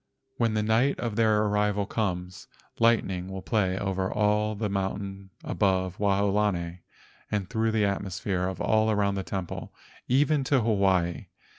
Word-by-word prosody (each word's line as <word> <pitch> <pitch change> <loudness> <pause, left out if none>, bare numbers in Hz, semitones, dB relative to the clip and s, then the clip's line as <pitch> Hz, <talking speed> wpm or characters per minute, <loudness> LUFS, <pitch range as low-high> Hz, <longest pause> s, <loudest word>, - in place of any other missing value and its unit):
When 115 -2 +1
the 105 - +1
night 115 +6 +2
of 115 -3 -2
their 110 -1 +3
arrival 105 -1 +1
comes, 90 -4 -3 0.3
lightning 100 -6 +2
will 95 0 -6
play 95 -5 +1
over 95 -1 -1
all 105 0 +1
the 105 +1 -2
mountains 95 0 -3
above 95 -2 0
Waolani 100 -3 +1 0.5
and 100 -3 -1
through 110 0 0
the 110 -2 +2
atmosphere 95 -1 -2
all 110 0 +2
around 100 -2 +2
the 100 - -2
temple, 95 -2 -5 0.3
even 140 +2 +3
to 130 -1 +3
Hawaii. 95 -6 +1
100 Hz, 140 wpm, -27 LUFS, 95-110 Hz, 0.5 s, their